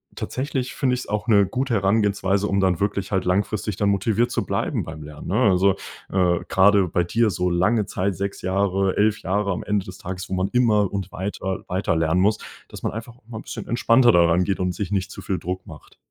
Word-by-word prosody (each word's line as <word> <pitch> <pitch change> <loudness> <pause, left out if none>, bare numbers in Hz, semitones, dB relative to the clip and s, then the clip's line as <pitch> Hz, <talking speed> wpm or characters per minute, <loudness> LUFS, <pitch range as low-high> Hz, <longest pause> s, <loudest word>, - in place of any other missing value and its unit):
tatsächlich 130 -1 -3
finde 130 -2 +1
ich 125 - -4
es - - -9
auch 105 +3 -2
'ne 100 -3 +5
gute 125 +5 -1
Herangehensweise, 100 -1 +1
um 100 - 0
dann 95 -3 +2
wirklich 100 -1 -2
halt 95 -2 0
langfristig 100 +2 0
dann 100 - +1
motiviert 110 +4 +1
zu - - -1
bleiben - - -1
beim 80 -1 -8
Lernen, 75 0 -10
ne? 95 - -1 0.2
Also, 95 +1 +3 0.3
äh, 90 -2 +2
gerade 95 -1 +4
bei 90 +1 0
dir 115 +6 +1
so 90 -2 -1
lange 105 +5 +2
Zeit 95 0 -2
6 100 +2 -4
Jahre 95 0 0
11, 105 +1 +2
Jahre 100 +1 0
am 90 - -3
Ende 100 -2 -1
des 95 0 -9
Tages, 95 +1 -6
wo - - -4
man 95 +1 0
immer 110 -5 +3
und 95 -2 -4
weiter 95 0 -4
weiter 90 -2 0
lernen 80 +2 +2
muss, 105 +2 +2 0.3
dass - - -10
man - - -1
einfach 115 +2 -8
mal 115 -2 -7
'n - - -8
bisschen - - -7
entspannter 120 +1 +4
daran 85 -1 +4
geht 95 0 -1
und 90 -1 0
sich 100 0 -4
nicht 95 -1 -1
zu - - -9
viel 95 -3 -2
Druck 90 +2 -5
macht. - - -13
100 Hz, 225 wpm, -23 LUFS, 90-105 Hz, 0.3 s, ne